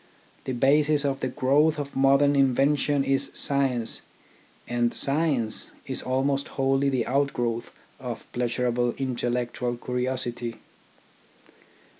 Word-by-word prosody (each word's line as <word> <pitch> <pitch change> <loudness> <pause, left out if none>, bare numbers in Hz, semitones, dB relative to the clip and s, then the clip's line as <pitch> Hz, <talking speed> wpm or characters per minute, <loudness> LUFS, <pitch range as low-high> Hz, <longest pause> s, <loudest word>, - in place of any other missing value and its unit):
The 130 - -2
basis 145 +3 +3
of 135 -1 0
the 130 - -1
growth 145 +5 +2
of 145 -1 -5
modern 140 +1 +4
invention 140 +1 +2
is 135 0 0
science, 135 -5 0 0.7
and 120 0 +1
science 140 -7 0 0.2
is - - -3
almost 135 +2 0
wholly 135 +1 +2
the 130 -4 0
out 140 +2 +1
growth 120 -1 -2 0.3
of - - -6
pleasurable 120 0 0
intellectual 120 -1 -2
curiosity. 125 -1 -3
135 Hz, 110 wpm, -26 LUFS, 120-140 Hz, 0.7 s, modern